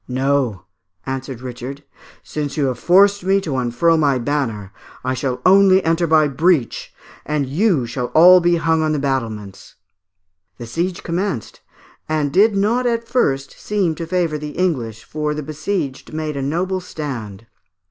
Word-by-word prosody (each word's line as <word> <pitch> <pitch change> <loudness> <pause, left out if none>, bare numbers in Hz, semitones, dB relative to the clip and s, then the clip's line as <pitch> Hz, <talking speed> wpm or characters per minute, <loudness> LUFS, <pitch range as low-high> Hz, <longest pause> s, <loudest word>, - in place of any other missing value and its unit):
"No," 130 -5 0 0.4
answered 130 -2 -5
Richard, 130 +3 -7 0.4
"since 150 -1 -4
you 145 - +2
have 125 -2 -2
forced 200 +2 +4
me 195 +1 +3
to 150 -8 -3
unfurl 130 +7 +2
my 145 -4 +2
banner, 115 -7 -2 0.3
I 130 0 -1
shall 130 0 -2
only 190 0 +6
enter 165 +1 +1
by 155 -1 +4
the 140 - -7
breach, 160 -3 +1 0.3
and 150 -2 -1
you 155 - +1
shall 125 +1 -3
all 180 +3 +8
be 175 0 +2
hung 165 -1 +1
on 155 0 +1
the - - 0
battlements." 115 -8 -4 0.8
The 120 - -7
siege 170 +9 -3
commenced, 170 - -3 0.5
and 150 -3 0
did 205 +3 +4
not 230 +5 +1
at 230 -1 -1
first 135 - 0
seem 200 -6 0
to 165 +1 -6
favour 165 -3 -1
the 150 0 -7
English, 120 - -1
for 150 -1 -3
the 150 - -4
besieged 150 -1 -4
made 155 -1 -4
a 140 - -3
noble 175 +7 -1
stand. 120 - -7
150 Hz, 160 wpm, -19 LUFS, 130-175 Hz, 0.8 s, all